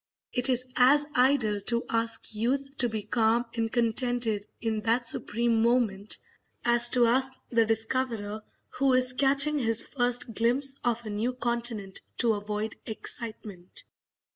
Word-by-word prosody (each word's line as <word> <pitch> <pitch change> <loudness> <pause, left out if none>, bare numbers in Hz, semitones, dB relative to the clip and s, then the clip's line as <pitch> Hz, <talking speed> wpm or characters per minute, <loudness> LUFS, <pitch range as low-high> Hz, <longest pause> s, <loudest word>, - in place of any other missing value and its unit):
It 250 +1 0
is 255 0 +4
as 285 +4 +5
idle 250 -5 +2
to 235 0 0
ask 230 0 +2
youth 270 +6 -2
to 245 - +3
be 220 -2 -4
calm 230 +1 +1
and 225 -1 -2
contented 235 -3 0
in 220 -2 -2
that 235 +2 0
supreme 230 0 -1
moment 225 -4 +1 0.5
as 240 0 +7
to 245 -1 +3
ask 260 +3 +2 0.2
the 230 -2 +2
discoverer 225 -2 -2 0.4
who 270 -1 +3
is 255 0 +3
catching 280 +3 +2
his 225 -3 +2
first 245 -2 0
glimpse 265 +5 +1
of 235 -1 -1
a 215 - -5
new 225 +5 -2
continent 235 -5 -2 0.2
to 230 -2 +2
avoid 210 +1 -4
excitement. 215 -4 -6
235 Hz, 140 wpm, -27 LUFS, 220-250 Hz, 0.5 s, as